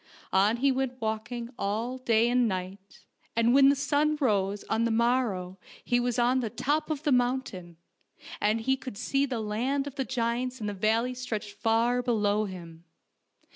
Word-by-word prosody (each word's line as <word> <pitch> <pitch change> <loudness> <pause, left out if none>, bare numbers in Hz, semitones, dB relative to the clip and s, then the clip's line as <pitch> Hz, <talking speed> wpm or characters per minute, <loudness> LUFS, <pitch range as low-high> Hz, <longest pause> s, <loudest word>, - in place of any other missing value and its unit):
On 205 +4 +3
he 275 +3 +3
went 260 -1 -2
walking 230 +2 -4
all 225 +6 -2
day 230 -2 +3
and 245 0 +3
night, 190 0 -6 0.3
and 230 +1 +3
when 275 0 +7
the 280 - +4
sun 295 +2 +1
rose 205 -6 0
on 220 +1 0
the 235 - +1
morrow 225 -6 0 0.2
he 245 - +1
was 245 0 -1
on 245 +2 +3
the 240 - -1
106 210 - -8
FAIRY 295 +3 +3
TALES - - -15
top 305 - -23
of 305 -1 -3
the 295 - +1
mountain, 245 -9 -1 0.6
and 215 +2 +2
he 265 +4 +2
could 255 -5 -8
see 275 +4 0
the 250 -3 -3
land 240 +6 -1
of 285 -1 -8
the 270 - 0
giants 250 0 -2
in 215 - -5
the 205 - -2
valley 225 +5 +1
stretched 225 -5 -5
far 230 +2 +1
below 215 -3 +1
him. 170 -4 -9
235 Hz, 190 wpm, -28 LUFS, 210-255 Hz, 0.6 s, when